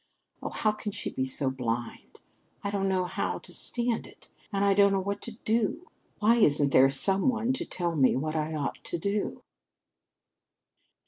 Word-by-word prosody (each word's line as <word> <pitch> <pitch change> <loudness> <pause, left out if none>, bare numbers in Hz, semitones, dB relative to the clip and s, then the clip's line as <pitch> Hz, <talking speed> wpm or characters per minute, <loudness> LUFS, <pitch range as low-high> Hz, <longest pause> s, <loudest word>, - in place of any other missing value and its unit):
Oh, - - -3
how 215 - +1
can 210 0 -5
she - - -4
be 130 - -1
so 130 +1 0
blind? 120 -2 -4 0.4
I 200 - -2
don't 195 -1 0
know 185 -1 +1
how 180 - -2
to - - -12
stand 240 -1 -1
it! - - -18 0.2
And 200 -1 +1
I 200 - +5
don't 200 0 +5
know 195 - +2
what 200 +2 -3
to 235 - -6
do! 230 - 0 0.3
Why 225 +3 +4
isn't 145 -9 +4
there 135 +1 +6
some 190 - +3
one 235 +1 0
to 260 - -3
tell 175 -2 -2
me 135 -4 +4
what 155 +4 -2
I 155 0 -1
ought 145 -2 -3
to - - -2
do?" 200 +4 -2
195 Hz, 185 wpm, -28 LUFS, 145-210 Hz, 0.4 s, there